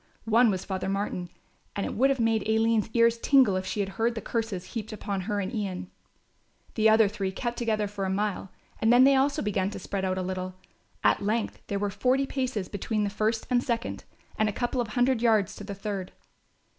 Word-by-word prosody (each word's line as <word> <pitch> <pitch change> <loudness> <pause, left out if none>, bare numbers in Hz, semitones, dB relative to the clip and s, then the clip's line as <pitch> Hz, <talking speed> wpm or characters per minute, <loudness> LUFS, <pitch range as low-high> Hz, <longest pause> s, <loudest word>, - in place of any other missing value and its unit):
One 230 +2 +5
was 190 -2 -2
Father 190 -1 -3
Martin, 195 -3 -2 0.5
and 200 - -1
it - - -3
would 265 +5 +3
have 270 -2 +1
made 225 -1 +1
Aline's 225 -1 +2
ears 230 0 +4
tingle 260 -7 +4
if 185 0 -2
she 205 - -1
had 195 - -2
heard 230 +3 0
the - - -2
curses 220 -6 -3
heaped 220 -2 -4
upon 200 -2 -3
her 205 +2 -2
and 195 +4 -3
Ian. 185 -4 -4 0.8
The 220 -1 +4
other 220 -1 +6
three 200 -2 -3
kept 240 +5 -3
together 215 -3 0
for 200 -1 -5
a 190 - 0
time 205 -1 -2 0.3
and 225 +1 +3
then 245 +1 +7
they 275 +1 +6
also 275 +1 +2
began 195 -2 0
to - - -7
spread 195 -1 -4
out 185 0 0
a 185 - -1
little. 185 0 -4 0.5
At - - +3
length 215 +2 -1
there 200 - -1
were 200 0 -1
forty 260 +6 +1
paces 255 -8 -2
between 210 +1 -2
the 200 - -1
first 220 +2 0
and 245 0 +3
second, 235 0 -3 0.3
and 215 0 +3
a - - -4
couple 245 +2 -1
of 235 - -3
hundred 245 +2 +1
yards 220 -6 +2
to - - -8
the 200 0 -6
third. 195 -2 -4
215 Hz, 220 wpm, -27 LUFS, 195-235 Hz, 0.8 s, then